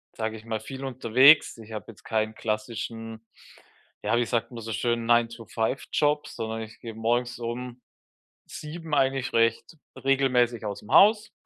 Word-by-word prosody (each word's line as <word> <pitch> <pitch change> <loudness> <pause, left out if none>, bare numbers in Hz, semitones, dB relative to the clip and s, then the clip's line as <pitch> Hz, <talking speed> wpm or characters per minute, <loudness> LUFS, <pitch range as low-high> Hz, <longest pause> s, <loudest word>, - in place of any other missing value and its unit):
sage 110 0 -3
ich 110 - -14
mal, 110 -1 -3
viel 130 +5 -8
unterwegs. 130 +3 +5
Ich 110 -1 -12
habe 105 -3 -6
jetzt 110 - -14
keinen 110 -1 -1
klassischen- 115 +1 -4 0.8
ja, 120 - +2
wie 120 - +2
sagt 115 0 -1
man 120 -1 -8
so 115 0 -5
schön- 115 +1 -1
Nine-to-five-Job, 120 +5 0
sondern 110 -1 -5
ich 110 +1 -12
gehe 115 -1 -7
morgens 120 +2 -1
um 120 +1 -5 0.6
7 160 +1 -8
eigentlich 135 -1 +1
recht 115 +6 +1 0.3
regelmäßig 125 -4 +2
aus 100 -1 -4
dem 105 - -12
Haus. 210 +1 +6
115 Hz, 150 wpm, -26 LUFS, 110-130 Hz, 0.8 s, Haus